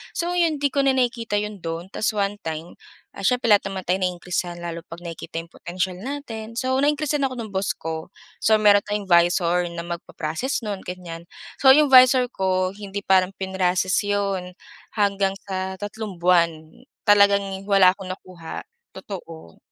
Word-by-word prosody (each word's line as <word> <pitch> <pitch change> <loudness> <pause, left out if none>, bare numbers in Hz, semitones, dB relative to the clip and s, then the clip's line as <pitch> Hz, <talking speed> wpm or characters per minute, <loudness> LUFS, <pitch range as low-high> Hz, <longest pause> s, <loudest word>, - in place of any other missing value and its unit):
So 345 +1 -1
'yon 330 -4 +2
'di 285 - +2
ko 280 - +2
na 270 -1 +3
nakikita 235 -4 0
'yon 210 -1 -5
do'n 165 +1 -4
tas 215 - 0
one 200 0 0
time, 160 +1 -5 0.4
ah, 195 - -8
siyempre 245 +2 +2
lahat 205 - +3
naman 190 -1 -4
tayong 185 +1 +1
na-increasan 175 -1 -3
lalo 170 -1 -5
'pag 165 +1 -10
nakikita 165 0 -6
yung 165 - -16
potensial 180 +1 -3
natin. 230 -3 -6
So, 260 0 0
na-increasan 295 +1 +1
ako 260 - -2
ng 220 -2 -5
boss 190 0 0
ko, 160 0 -5 0.3
so 220 - +5
meron 205 -1 +6
tayong 205 -1 -3
'visor 175 0 +3
na 170 - -4
mag-pa-proccess 170 - -3
no'n, 200 -2 -4
ganyan. 170 -2 -7 0.4
So, 265 -1 +8
yung 300 0 +4
'visor 255 -1 +7
ko, 185 -1 0
hindi 200 -1 -6
parang 190 0 +3
prinocess 185 0 +1
'yon, 195 -3 -1 0.4
hanggang 200 -2 +2 0.2
sa 190 0 -3
tatlong 205 -3 -6
buwan, 170 -1 +4 0.6
talagang 200 -1 +4
wala 195 -2 +6
akong 190 -2 -7
nakuha. 180 -3 -8 0.3
Totoo. 165 - -9
195 Hz, 165 wpm, -23 LUFS, 180-220 Hz, 0.6 s, So